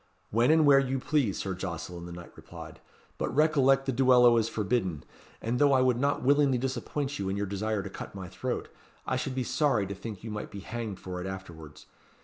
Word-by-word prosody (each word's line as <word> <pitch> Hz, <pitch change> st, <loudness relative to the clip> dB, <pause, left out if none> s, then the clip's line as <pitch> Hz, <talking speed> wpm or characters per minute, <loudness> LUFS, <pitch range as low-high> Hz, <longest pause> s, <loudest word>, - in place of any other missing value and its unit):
"When 115 Hz, +4 st, +3 dB
and 160 Hz, 0 st, +5 dB
where 140 Hz, -1 st, +7 dB
you 135 Hz, 0 st, -1 dB
please, 130 Hz, -6 st, 0 dB
Sir 95 Hz, -, -3 dB
Jocelyn," 85 Hz, -1 st, -6 dB
the -, -, -9 dB
knight 85 Hz, 0 st, -10 dB
replied; -, -, -11 dB, 0.4 s
"but -, -, -1 dB
recollect 135 Hz, -3 st, +4 dB
the 135 Hz, -, 0 dB
duello 125 Hz, -1 st, +5 dB
is 115 Hz, 0 st, +1 dB
forbidden, 100 Hz, -8 st, -1 dB, 0.4 s
and, 120 Hz, +2 st, -1 dB
though 145 Hz, -1 st, +5 dB
I 130 Hz, -, +4 dB
would 125 Hz, -2 st, +2 dB
not 140 Hz, 0 st, 0 dB
willingly 140 Hz, -1 st, +4 dB
disappoint 135 Hz, +2 st, -3 dB
you 95 Hz, -1 st, -2 dB
in 95 Hz, -, -2 dB
your 100 Hz, -, -1 dB
desire 100 Hz, +1 st, -2 dB
to -, -, -6 dB
cut -, -, -8 dB
my 95 Hz, -2 st, -6 dB
throat, -, -, -4 dB, 0.4 s
I -, -, -1 dB
should 130 Hz, 0 st, -3 dB
be 130 Hz, -, 0 dB
sorry 130 Hz, -6 st, +1 dB
to 100 Hz, -, -5 dB
think 100 Hz, 0 st, -8 dB
you 110 Hz, -, -6 dB
might 105 Hz, 0 st, -5 dB
be 100 Hz, -, -8 dB
hanged 110 Hz, -3 st, -5 dB
for 90 Hz, -1 st, -6 dB
it 90 Hz, -, -5 dB
afterwards. 80 Hz, -6 st, -9 dB
115 Hz, 215 wpm, -29 LUFS, 95-135 Hz, 0.4 s, where